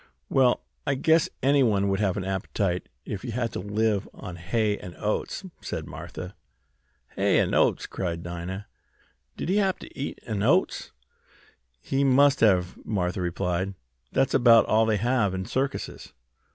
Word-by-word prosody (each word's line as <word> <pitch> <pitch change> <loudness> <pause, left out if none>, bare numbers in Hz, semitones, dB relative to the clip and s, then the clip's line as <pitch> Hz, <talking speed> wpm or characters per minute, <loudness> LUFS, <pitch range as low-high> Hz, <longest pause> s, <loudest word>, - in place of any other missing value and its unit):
"Well, 130 -2 +3 0.2
I 140 - +2
guess 160 +3 +3
anyone 125 -8 +3
would 95 0 0
have 100 -3 +1
an 95 - -2
appetite 95 -1 -2 0.2
if 100 - -4
they 125 - -6
had 115 -1 -2
to - - -3
live 105 +1 0
on 90 -5 -8
hay 105 +4 0
and 90 - -9
oats," 105 - -2 0.2
said - - -4
Martha. 90 +1 -8 0.8
"Hay - - +3
an' - - +1
oats!" - - +3
cried 85 -3 -4
Dinah. 90 +3 -5 0.7
"Did - - -4
he 190 +4 +2
hab 195 -2 +2
t' - - -11
eat 140 - -5
hay - - -9
an' 100 -2 -1
oats?" 160 - +2 0.9
"He 135 - 0
must 140 +1 +5
have," 90 -5 +2
Martha 90 -3 -1
replied. 90 +2 -1 0.4
"That's 135 0 +1
about 120 -3 +6
all 110 +1 +3
they 110 -1 +2
have 110 -3 +1
in 95 0 -3
circuses." 135 +5 -3
105 Hz, 160 wpm, -26 LUFS, 95-130 Hz, 0.9 s, about